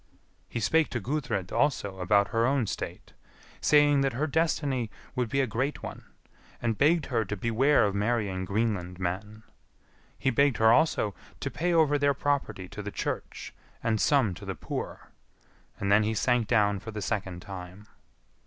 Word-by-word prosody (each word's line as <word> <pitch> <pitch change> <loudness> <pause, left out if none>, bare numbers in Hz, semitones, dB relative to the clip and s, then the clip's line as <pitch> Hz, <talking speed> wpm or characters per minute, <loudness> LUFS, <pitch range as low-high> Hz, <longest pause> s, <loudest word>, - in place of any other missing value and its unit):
He 120 - -3
spake 160 +8 +2
to 120 - -2
Gudrid 120 -6 -2
also 100 -9 0
about 100 +2 +3
her 115 +1 +2
own 135 -3 +2
state, - - -6 0.5
saying 145 -1 +5
that 135 -1 +1
her 140 +6 0
destiny 145 -6 0 0.3
would 125 -3 -1
be 135 +4 +1
a - - +2
great 130 +5 -2
one, - - -7 0.5
and 115 -2 0
begged 155 +5 +3
her 115 -1 +2
to 105 0 -5
beware 115 +6 +3
of 100 - 0
marrying 100 -3 0
Greenland 100 -3 -1
men. 105 +5 -4 0.7
He 130 - +1
begged 140 0 +3
her 110 0 +6
also 115 -8 +2 0.3
to - - -3
pay 175 +2 -1
over 155 -3 +3
their 140 0 +2
property 140 -10 -1
to 105 - -7
the 105 - -5
Church - - -5 0.3
and 110 -2 +1
some 130 -10 +3
to - - -11
the - - -4
poor; - - -6 0.7
and 100 0 -1
then 100 +1 +6
he 110 +1 0
sank 120 +1 +2
down 105 -3 +2
for 110 - -9
the 105 -2 -5
second 95 -6 -3
time. 95 +1 -9
115 Hz, 170 wpm, -28 LUFS, 100-140 Hz, 0.7 s, her